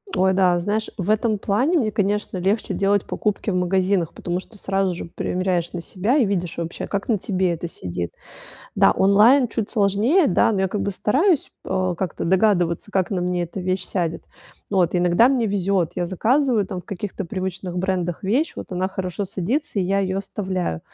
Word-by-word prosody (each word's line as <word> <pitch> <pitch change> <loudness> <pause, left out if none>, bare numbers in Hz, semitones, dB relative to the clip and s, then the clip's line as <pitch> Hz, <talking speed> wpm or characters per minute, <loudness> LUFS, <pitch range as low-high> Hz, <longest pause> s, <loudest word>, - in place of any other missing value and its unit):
Ой, 190 0 +3
да, 185 -2 +3
знаешь, 210 +5 -1
в 195 +2 0
этом 215 0 +1
плане 250 - +1
мне, 225 -8 +1
конечно, 205 -1 -1
легче 200 +5 0
делать 200 0 +1
покупки 210 0 -2
в - - -1
магазинах, 180 -1 +1
потому 175 +1 -3
что 215 +3 -13
сразу 195 -2 0
же - - -6
примеряешь 180 -2 -1
на 175 - -4
себя 205 - 0
и 265 - +4
видишь 180 -4 -2
вообще, 170 0 -4
как 200 0 -3
на 220 -4 +2
тебе 185 -2 0
это 170 +1 -4
сидит. 90 - -5 0.7
Да, - - +5
онлайн 215 +8 +5
чуть 220 -2 -3
сложнее, 220 - +3
да, 180 - +3
но 195 -3 0
я 190 - +1
как 205 +2 -3
бы 200 - -1
стараюсь, 280 - +1
э, 185 -1 0
как-то 185 -1 -3
догадываться, 185 -1 +2
как 190 -2 0
на 185 - -1
мне 180 0 0
эта 175 +3 -7
вещь 185 0 -1
сядет. 170 -3 -2 0.4
Вот 185 -3 +2
иногда 180 +7 +4
мне 255 -4 +1
везет. 195 -4 0
Я 175 - -1
заказываю, 225 - +2
там, 185 - -5
в - - -20
каких-то 200 0 -5
привычных 185 0 -4
брендах 180 -1 -2
вещь, 260 - +1
вот - - -7
она 185 +1 -1
хорошо 190 +1 -3
садится, 225 - -2
и - - +2
я 195 +2 +1
ее 190 -1 -1
оставляю. 185 - -3
190 Hz, 190 wpm, -22 LUFS, 180-210 Hz, 0.7 s, Да